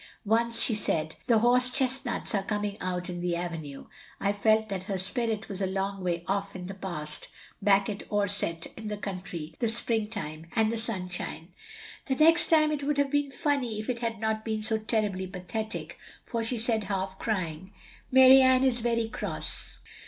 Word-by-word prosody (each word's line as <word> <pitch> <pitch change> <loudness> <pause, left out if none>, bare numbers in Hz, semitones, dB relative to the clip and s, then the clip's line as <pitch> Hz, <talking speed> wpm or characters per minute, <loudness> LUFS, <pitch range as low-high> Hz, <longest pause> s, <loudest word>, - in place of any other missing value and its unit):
Once 230 +2 +3
she 230 - +3
said 160 -7 0
'The 230 - +5
horse 250 +2 +5
chestnuts 260 -1 +1
are 200 - +2
coming 205 0 -2
out 180 -1 -2
in 175 -1 -5
the 175 -1 0
avenue. 165 -5 -5
' - - -18 0.2
/ 200 0 +2
felt 220 +1 +3
that 190 -3 -4
her 195 - 0
spirit 220 +3 -1
was 195 -2 -4
a 190 - +1
long 195 0 -2
way 170 -1 -1
off 200 0 -2
in 180 -1 -6
the 195 - -6
past, 160 -6 -4 0.3
back 195 0 +4
at 205 -1 -6
Orsett, 200 -5 0
in 220 -1 -7
the 210 0 -3
country, 180 -5 -6
the 235 - +1
spring 225 -1 0
time 155 -4 -6
and 220 -1 +3
the - - -1
sunshine. 180 -6 -4 0.6
"The 265 - +1
next 330 +4 +5
time 310 -2 +4
it 295 -2 -2
would 285 +1 0
have 285 -1 +1
been 290 -1 +1
funny 270 -6 -1
if 215 +4 -2
it 235 - -4
had 230 -2 -3
not 220 0 -1
been 220 -1 -2
so 220 0 +1
terribly 210 -4 -1
pathetic, 215 +4 -5 0.3
for 230 -2 -2
she 235 +2 -1
said 225 -2 0
half 190 -1 -3
crying, 185 -4 -3 0.4
'Mary 260 +1 +8
Ann 260 0 +5
is 255 -2 +2
very 230 -1 +1
cross. - - -3
215 Hz, 190 wpm, -28 LUFS, 190-235 Hz, 0.6 s, Mary